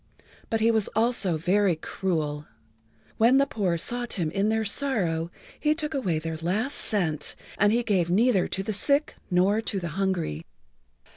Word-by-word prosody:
But 225 -1 0
he 230 +1 +4
was 220 -3 +1
also 220 -7 +1
very 185 +2 +2
cruel. 155 -3 -3 0.7
When 235 +4 +5
the 275 - +4
poor 195 -10 -1
sought 240 +7 -3
him 165 -5 -2
in 195 +4 +1
their 220 0 0
sorrow 195 - 0 0.3
he 305 0 +2
took 310 -1 -3
away 195 - 0
their 160 +1 -4
last 200 - -1
cent, 160 -9 -1 0.2
and 205 +1 +5
he 240 +2 +2
gave 185 -6 +1
neither 205 +1 +3
to 195 - -3
the 215 - -3
sick 280 +8 +1 0.2
nor 190 +4 +3
to 205 -3 -3
the 175 -2 -4
hungry. 175 - -1
195 Hz, 165 wpm, -26 LUFS, 170-230 Hz, 0.7 s, When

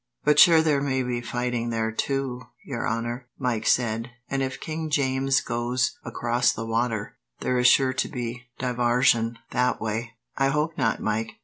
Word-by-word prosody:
"But 150 0 +4
sure 165 -2 +8
there 150 -3 +2
may 130 -2 0
be 120 -1 -2
fighting 120 -1 -2
there, 110 -1 -1
too, 135 +1 -2 0.2
your 125 -4 -2
honour," 120 +2 -3
Mike 120 -5 -1
said; 115 0 +1 0.2
"and 135 0 0
if 130 -1 -3
King 160 0 -4
James 135 -2 +1
goes 120 +1 -1
across 120 0 +1
the 110 - -5
water, 115 -2 -2 0.2
there 125 -1 +1
is 125 - +5
sure 130 0 +5
to - - -1
be 120 0 -5
divarsion 120 -2 +2 0.2
that 125 0 +1
way." 110 +2 -3 0.2
"I 135 - +2
hope 150 +3 0
not, - - 0
Mike. 110 +1 -1
125 Hz, 170 wpm, -25 LUFS, 115-135 Hz, 0.2 s, sure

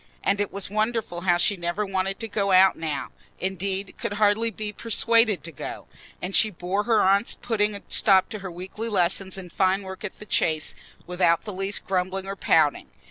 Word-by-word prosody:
And 200 +1 +1
it 205 - -2
was 200 -1 -4
wonderful 215 -4 -1
how 175 -1 +3
she 190 +4 +2
never 175 +3 -2
wanted 195 0 -2
to 225 - -3
go 200 -2 -1
out 190 +1 +6
now—indeed, 190 +5 -4
could - - -3
hardly 210 +2 +2
be 215 -1 -6
persuaded 230 - +2
to 170 - -7
go; 140 - -7 0.4
and 185 +2 -2
she 215 - +5
bore 195 +2 -2
her 225 -3 +3
aunt's 200 +4 +3
putting 210 -3 -1
a 200 - -9
stop 190 -3 +4
to 215 - -6
her 190 -1 -6
weekly 190 +6 -6
lesson 190 -1 +1
in 180 -2 -8
fine 190 +2 +1
work 190 +1 -9
at 210 - -6
the 210 - -11
Chase 155 -6 0 0.3
without 180 -2 +2
the 210 - -6
least 195 +2 -2
grumbling 190 0 -1
or 195 0 -5
pouting. - - +2
195 Hz, 190 wpm, -25 LUFS, 185-210 Hz, 0.4 s, out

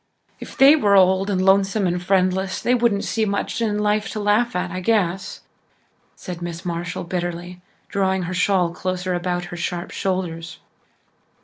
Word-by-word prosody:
"If - - -10
they 275 +3 +8
were 205 -10 +3
old 190 +1 +4
and 190 -2 0
lonesome 195 +1 +3
and 175 0 -1
friendless 190 0 +1
they 245 - +1
wouldn't 235 -5 +2
see 225 - -1
much 200 +2 -2
in 210 -2 0
life 210 +1 0
to 215 - -4
laugh 210 +3 +1
at, 180 0 -2
I 185 - -4
guess," 190 -2 -1 0.7
said 175 -2 -8
Miss 175 +1 -6
Marshall 170 0 -4
bitterly, 175 0 -5 0.3
drawing 190 -1 0
her 180 +1 -4
shawl 180 -1 +2
closer 185 0 -3
about 175 0 -2
her - - -5
sharp 175 0 -4
shoulders. 170 -4 -3
185 Hz, 165 wpm, -22 LUFS, 175-200 Hz, 0.7 s, they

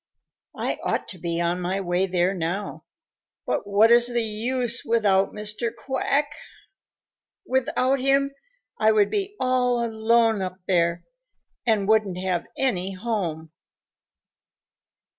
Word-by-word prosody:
I - - -2
ought - - -1
to 185 - -8
be 170 0 -2
on 175 +1 0
my 185 +2 -1
way 185 0 0
there 180 0 +1
now, 180 +3 -4 0.6
but - - -2
what 210 +3 +4
is 240 0 +6
the 240 -1 0
use 235 +3 0
without 205 -4 +2
Mr. 215 +2 -4
Quack? 275 +4 -1 1.1
Without 260 -1 +1
him, 275 +1 +2 0.5
I 220 0 +4
would 205 -2 +3
be 405 0 -2
all 250 -2 +1
alone 225 -1 +2
up 185 -1 -4
there 170 -2 +1 0.6
and 210 -4 +2
wouldn't 215 -4 +2
have 185 -2 -2
any 195 -8 0
home." 185 -7 -3
215 Hz, 120 wpm, -24 LUFS, 185-240 Hz, 1.1 s, is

